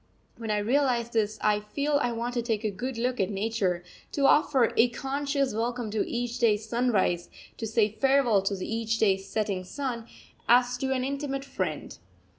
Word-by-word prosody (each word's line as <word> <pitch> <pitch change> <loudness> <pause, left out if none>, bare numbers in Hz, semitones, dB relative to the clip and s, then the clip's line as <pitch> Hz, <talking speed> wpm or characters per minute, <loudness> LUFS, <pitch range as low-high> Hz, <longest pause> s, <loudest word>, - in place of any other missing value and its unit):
When 225 -2 -7
I 210 - +1
realise 240 +1 +1
this 215 -2 0
I 210 -1 +3
feel 285 +8 0
I 245 - +1
want 235 +1 -3
to 240 - 0
take 225 -2 -2
a 215 - 0
good 245 +6 -5
look 250 +2 -1
at 190 -1 +1
nature, 200 -4 -1 0.3
to 280 - +1
offer 270 -4 +4
a 235 +2 +5
conscious 275 +1 -1
welcome 235 0 -2
to 215 - +1
each 240 0 -3
day's 215 -2 +2
sunrise, 215 -7 +1 0.3
to 225 - -3
say 220 -1 +3
farewell 255 -2 +3
to 195 -1 -2
each 225 0 -1
day's 195 -3 +1
setting 200 -4 -1
sun, 235 +2 -4 0.4
as 245 +1 +5
to 265 +1 -1
an 260 -1 0
intimate 275 0 -3
friend. - - -4
235 Hz, 180 wpm, -27 LUFS, 210-255 Hz, 0.4 s, a